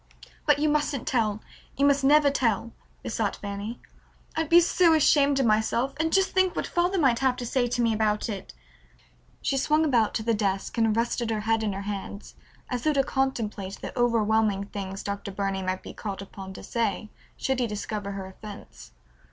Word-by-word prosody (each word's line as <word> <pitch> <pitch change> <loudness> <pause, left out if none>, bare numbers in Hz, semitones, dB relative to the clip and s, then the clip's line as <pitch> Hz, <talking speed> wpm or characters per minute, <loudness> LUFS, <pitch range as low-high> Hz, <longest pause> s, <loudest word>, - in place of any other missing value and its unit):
"But 295 -1 +5
you 300 +1 +1
mustn't 295 -3 0
tell. 220 -7 0 0.4
You 280 - +3
must 280 -1 +3
never 290 +1 +5
tell," 230 -4 0 0.3
besought - - -1
Fanny. 205 +3 -6 0.6
"I'd 320 -1 -1
be 340 - +8
so 345 -1 +4
ashamed 285 -2 +4
of 265 - +2
myself, 225 +4 +1
and 320 0 +1
just 385 +1 +3
think 375 -1 +2
what - - -1
father 355 +2 0
might 265 -8 +3
have 260 -2 +2
to 245 - -5
say 245 +1 +1
to 240 0 0
me 230 -1 +2
about 215 -1 0
it!" 195 -4 -6 0.9
She 275 - +1
swung 305 +3 +2
about 235 -7 +2
to 220 - -1
the 230 +1 +1
desk 195 -2 -1
and 225 -1 +2
rested 235 0 0
her 220 -1 -1
head 225 +1 +1
in 210 -2 -1
her 195 +1 -5
hands 200 0 -6 0.3
as 250 -2 -3
though 310 - +2
to 275 -1 +3
contemplate 225 -8 -2
the - - -7
overwhelming 220 -4 +2
things 195 -1 -6
Dr. 200 0 -4
Burney 195 0 -2
might 185 0 -3
be - - -9
called 200 -2 -5
upon 190 -1 -9
to - - -10
say 215 -2 -2 0.3
should 265 -1 -1
he 245 - +1
discover 210 -1 -4
her 195 -1 -5
offense. 200 - -11
230 Hz, 195 wpm, -26 LUFS, 205-275 Hz, 0.9 s, be